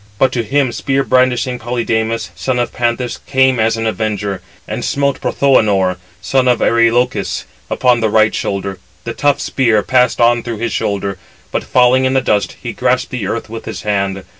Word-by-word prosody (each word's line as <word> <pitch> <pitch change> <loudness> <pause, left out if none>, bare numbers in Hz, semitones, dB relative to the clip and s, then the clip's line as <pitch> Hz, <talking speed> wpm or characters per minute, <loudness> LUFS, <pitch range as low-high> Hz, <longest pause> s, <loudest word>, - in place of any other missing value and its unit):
But 130 +4 +3
to 125 - -1
him 130 +3 0
spear 135 +2 -1
brandishing 125 -1 +1
Polydamas, 115 -1 -2
son 130 -1 -2
of 120 -1 -1
Panthous, 120 0 -1
came 130 -2 +3
as 110 +1 +2
an 115 - -2
avenger, 105 -3 -2 0.3
and 110 +3 -4
smote 140 -1 0
Prothoënor, 100 -9 +2 0.3
son 130 +6 +1
of 125 -1 +4
Areïlochus, 115 +1 +1 0.3
upon 125 -2 +2
the 110 -1 +1
right 110 +1 +3
shoulder. 100 -1 -3 0.2
The 115 - -4
tough 145 +3 +1
spear 115 -6 +1
passed 125 +1 +2
on 120 0 +4
through 115 -1 -5
his 115 +2 -3
shoulder, 100 -2 -2 0.3
but - - -1
falling 130 +1 +3
in 130 +1 +1
the - - +5
dust, 105 -5 0
he - - -4
grasped - - 0
the - - -3
earth - - -3
with - - -8
his - - -6
hand. 100 -2 -1
120 Hz, 180 wpm, -16 LUFS, 110-130 Hz, 0.3 s, the